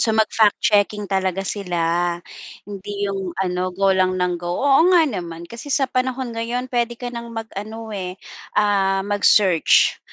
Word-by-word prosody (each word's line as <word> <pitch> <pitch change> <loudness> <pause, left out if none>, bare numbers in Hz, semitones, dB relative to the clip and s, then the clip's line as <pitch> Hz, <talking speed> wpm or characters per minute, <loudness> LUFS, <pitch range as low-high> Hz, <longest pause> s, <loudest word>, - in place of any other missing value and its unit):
So, 220 -1 +2
mag-fact 220 -1 +3
checking 210 0 +2
talaga 190 0 0
sila. 175 -3 -1 0.5
Hindi 205 0 -8 0.2
yung 190 -2 -4
ano, 185 -1 -1
go 195 +1 +2
lang 185 0 +2
ng 180 -1 0
go. 175 0 -3
Oo 285 +5 +5
nga 345 - +6
naman, 170 - -5
kasi 235 +5 -9
sa 275 - +2
panahon 255 0 -1
ngayon 240 +3 -3
puwede 240 -1 0
ka 245 0 -6
nang 235 0 -6
mag-ano, 220 0 -7
eh, 185 -2 -4 0.4
ah, 195 -2 +2
mag-search 205 -4 +4
205 Hz, 155 wpm, -21 LUFS, 185-230 Hz, 0.5 s, nga